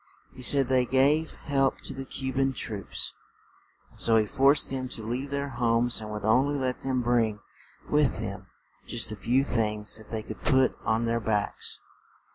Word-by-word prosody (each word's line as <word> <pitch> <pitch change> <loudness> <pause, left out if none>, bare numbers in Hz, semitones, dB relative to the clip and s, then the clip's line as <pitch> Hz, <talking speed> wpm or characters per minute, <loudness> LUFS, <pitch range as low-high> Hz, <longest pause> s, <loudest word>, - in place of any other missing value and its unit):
He 130 - -11
said 135 +1 +5
they 130 -1 +2
gave 145 +5 +2
help 135 -2 0
to - - -4
the 135 0 -7
Cu 130 0 -5
ban 135 0 +1
troops, 105 -5 -4 0.8
and - - -12
so 115 -1 +5
he 110 - +3
forced 135 +7 +3
them 130 -1 -3
to 115 - -5
leave 125 +5 -3
their 140 0 -3
homes 120 -1 +1
and 105 - -7
would 105 -1 -5
on 125 +6 +4
ly 145 -1 -1
let 125 -1 -3
them 130 -2 -1
bring 115 -3 +1 0.5
with 150 -2 +2
them - - -6 0.4
just 115 -2 +1
the - - -4
few 125 +6 +1
things 105 -5 +1
that 110 - -15
they 110 -1 -4
could 110 - -9
put 130 -3 +3
on 110 +1 +1
their 115 0 0
backs. 105 -2 -1
125 Hz, 190 wpm, -27 LUFS, 110-135 Hz, 0.8 s, said